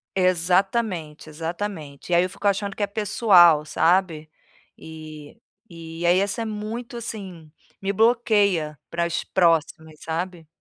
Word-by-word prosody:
Exatamente, 185 Hz, -2 st, 0 dB
exatamente, 160 Hz, -1 st, -6 dB
e 170 Hz, -, +4 dB
aí, 175 Hz, -, +5 dB
eu 185 Hz, -, -2 dB
fico 205 Hz, -, -4 dB
achando 200 Hz, 0 st, -1 dB
que 205 Hz, -, -2 dB
é -, -, 0 dB
pessoal, 195 Hz, -7 st, +4 dB
sabe. 165 Hz, -2 st, +1 dB, 0.5 s
E 155 Hz, -2 st, -11 dB, 0.3 s
e, 165 Hz, 0 st, -8 dB
aí, 175 Hz, +2 st, +4 dB
essa 200 Hz, +3 st, -1 dB
é -, -, -5 dB
muito, 220 Hz, +3 st, -6 dB
assim, 190 Hz, -9 st, -8 dB, 0.3 s
me 195 Hz, -, -1 dB
bloqueia 200 Hz, -, +2 dB
para 170 Hz, 0 st, -1 dB
as 170 Hz, -, -2 dB
próximas, 160 Hz, -3 st, 0 dB
sabe. 165 Hz, 0 st, -5 dB
180 Hz, 135 wpm, -23 LUFS, 160-205 Hz, 0.5 s, aí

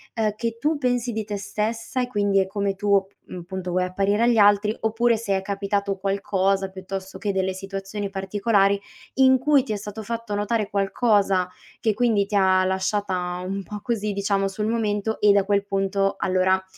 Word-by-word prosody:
ehm, 215 Hz, -2 st, 0 dB
che 230 Hz, +1 st, -3 dB
tu 305 Hz, +4 st, +1 dB
pensi 245 Hz, -2 st, 0 dB
di 220 Hz, 0 st, -2 dB
te 205 Hz, -1 st, -4 dB
stessa 220 Hz, +5 st, -3 dB
e 250 Hz, -, -1 dB
quindi 205 Hz, -4 st, +1 dB
è 190 Hz, -, +1 dB
come 200 Hz, 0 st, -2 dB
tuo 200 Hz, 0 st, +2 dB
p 195 Hz, -, -30 dB
mhmm, 180 Hz, -, -6 dB
punto, 185 Hz, 0 st, -5 dB
vuoi 180 Hz, +1 st, +1 dB
apparire 200 Hz, +4 st, +1 dB
agli 235 Hz, -1 st, +3 dB
altri, 205 Hz, 0 st, +5 dB
oppure 225 Hz, +1 st, +2 dB
se 205 Hz, -3 st, -1 dB
è -, -, -3 dB
capitato 200 Hz, 0 st, -2 dB
qualcosa, 195 Hz, 0 st, 0 dB
piuttosto 190 Hz, 0 st, -7 dB
che 205 Hz, -2 st, -1 dB
delle 190 Hz, 0 st, 0 dB
situazioni 195 Hz, +1 st, -5 dB
particolari 200 Hz, +1 st, +1 dB, 0.4 s
in 260 Hz, 0 st, +6 dB
cui 285 Hz, 0 st, +3 dB
ti 230 Hz, -5 st, -3 dB
è -, -, -1 dB
stato 210 Hz, +1 st, -7 dB
fatto 230 Hz, -1 st, -4 dB
notare 210 Hz, +1 st, -1 dB
qualcosa, 200 Hz, -2 st, +2 dB, 0.4 s
che 220 Hz, -, +2 dB
quindi 220 Hz, -2 st, +2 dB
ti 210 Hz, -, -3 dB
ha 190 Hz, -1 st, +4 dB
lasciata 185 Hz, -2 st, -1 dB
un 195 Hz, +1 st, -3 dB
po' 210 Hz, +1 st, -8 dB
così, 210 Hz, -3 st, -1 dB
diciamo, 200 Hz, 0 st, 0 dB
sul 210 Hz, +2 st, -3 dB
momento 220 Hz, -1 st, -1 dB
e 205 Hz, -1 st, +6 dB
da 200 Hz, -1 st, +4 dB
quel 200 Hz, 0 st, +1 dB
punto 195 Hz, 0 st, 0 dB
allora 185 Hz, 0 st, +2 dB
200 Hz, 190 wpm, -24 LUFS, 195-220 Hz, 0.4 s, in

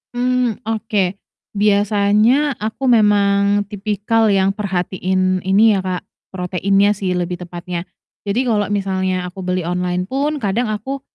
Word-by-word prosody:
Mmm, 250 Hz, -2 st, 0 dB
oke 210 Hz, -4 st, -1 dB, 0.4 s
biasanya 210 Hz, +7 st, +3 dB
aku 220 Hz, +5 st, -3 dB
memang 205 Hz, -3 st, +3 dB
tipikal 210 Hz, +2 st, 0 dB
yang 195 Hz, 0 st, +2 dB
perhatiin 185 Hz, -1 st, -1 dB
ini 205 Hz, +4 st, +4 dB
ya, 195 Hz, -, 0 dB
Kak, 185 Hz, -1 st, -3 dB, 0.3 s
proteinnya 195 Hz, +2 st, +1 dB
sih 190 Hz, -2 st, -2 dB
lebih 180 Hz, 0 st, -3 dB
tepatnya. 175 Hz, 0 st, -6 dB, 0.5 s
Jadi 220 Hz, +6 st, +1 dB
kalau 210 Hz, -4 st, +1 dB
misalnya 190 Hz, -2 st, -1 dB
aku 180 Hz, +2 st, -9 dB
beli 180 Hz, 0 st, -1 dB
online 180 Hz, +1 st, -1 dB
pun 280 Hz, +7 st, -1 dB
kadang 220 Hz, +2 st, 0 dB
aku 265 Hz, +6 st, -4 dB
200 Hz, 130 wpm, -18 LUFS, 185-220 Hz, 0.5 s, ini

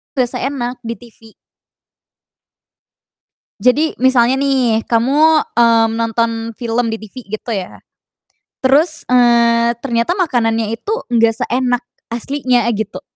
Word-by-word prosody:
Nggak 250 Hz, -2 st, +1 dB
seenak, 255 Hz, -2 st, -4 dB
di 230 Hz, -, -3 dB
TV. 225 Hz, 0 st, -17 dB, 2.3 s
Jadi 295 Hz, +6 st, +2 dB
misalnya 255 Hz, -1 st, +4 dB
nih, 255 Hz, -5 st, +1 dB
kamu, 290 Hz, +7 st, +3 dB
mmm, 230 Hz, -1 st, +4 dB
nonton 230 Hz, 0 st, 0 dB, 0.3 s
film 235 Hz, -1 st, -1 dB
di 225 Hz, -, -3 dB
TV 215 Hz, +1 st, -14 dB, 0.2 s
gitu 235 Hz, -, -8 dB
ya, 190 Hz, -3 st, -5 dB, 0.8 s
terus, 300 Hz, +5 st, +1 dB
eee, 235 Hz, -1 st, +3 dB
ternyata 240 Hz, -, -1 dB
makanannya 225 Hz, -, 0 dB
itu 410 Hz, -, -3 dB, 0.2 s
nggak 230 Hz, -1 st, +3 dB
seenak 250 Hz, 0 st, 0 dB, 0.3 s
aslinya, 245 Hz, 0 st, -1 dB
gitu. 210 Hz, 0 st, -5 dB
240 Hz, 110 wpm, -16 LUFS, 230-260 Hz, 2.3 s, misalnya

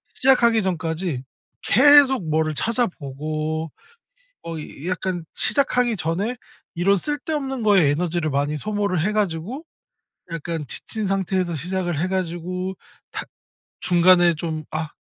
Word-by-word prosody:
시작하기 235 Hz, -4 st, +4 dB
전까지 165 Hz, -5 st, -2 dB, 0.4 s
계속 265 Hz, -, +6 dB
뭐를 155 Hz, 0 st, +1 dB
찾아 235 Hz, -, +1 dB
보고 155 Hz, +1 st, -4 dB, 0.7 s
뭐 165 Hz, -1 st, -5 dB, 0.3 s
약간 185 Hz, -2 st, -2 dB
시작하기 245 Hz, 0 st, +3 dB
전에 190 Hz, +8 st, -2 dB, 0.4 s
이런 185 Hz, +4 st, +3 dB
쓸데없는 290 Hz, -, -2 dB
거에 195 Hz, -8 st, +5 dB
에너지를 165 Hz, 0 st, -1 dB
많이 145 Hz, +2 st, 0 dB
소모를 205 Hz, -2 st, -1 dB
해 210 Hz, +6 st, +1 dB
가지고 210 Hz, -, -2 dB, 0.7 s
약간 165 Hz, -1 st, -4 dB
지친 215 Hz, -, -2 dB
상태에서 190 Hz, -2 st, 0 dB
시작을 175 Hz, +1 st, -2 dB
해가지고 185 Hz, +1 st, -2 dB, 0.4 s
탁 -, -, -6 dB, 0.5 s
중간에 175 Hz, -1 st, +5 dB
좀 155 Hz, -1 st, -4 dB
아 155 Hz, -1 st, -3 dB
180 Hz, 265 characters per minute, -22 LUFS, 160-210 Hz, 0.7 s, 계속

